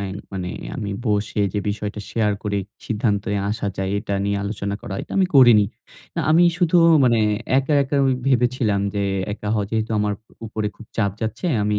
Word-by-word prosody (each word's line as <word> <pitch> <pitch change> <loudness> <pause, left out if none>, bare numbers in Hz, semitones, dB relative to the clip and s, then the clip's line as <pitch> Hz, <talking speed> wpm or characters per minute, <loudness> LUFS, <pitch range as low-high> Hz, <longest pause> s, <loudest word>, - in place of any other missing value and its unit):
আ - - -3 0.3
মানে 90 -2 -3 0.3
আমি 100 - -4 0.2
বসে 105 0 0
যে - - -1
বিষয়টা 105 0 -3
শেয়ার 110 -2 +1
করে 100 -1 -1 0.3
সিদ্ধান্তে 105 -2 0 0.2
আসা 105 -1 -3
যায়, 95 0 -2
এটা 100 -1 -3
নিয়ে 100 0 0
আলোচনা 100 -1 -3
করা। 100 - -5
এটা - - -10
আমি 190 - +4
করিনি। 120 -6 +7 0.5
না - - +1
আমি 165 +3 +6 0.2
শুধু 175 -1 +3 0.3
মানে 120 -2 +4 0.4
একা, 135 +2 0
একা 140 +1 -2
ঐ - - +3 0.2
ভেবেছিলাম 125 -5 +2
যে 100 - 0 0.3
একা 105 0 -5
হয় 105 -2 0
যেহেতু 110 0 -1
আমার 105 0 0 0.3
উপরে 110 -1 -3
খুব 115 - -13
চাপ 100 -3 +2
যাচ্ছে। 110 - -3 0.2
আমি 105 0 +1
105 Hz, 185 wpm, -22 LUFS, 100-120 Hz, 0.5 s, করিনি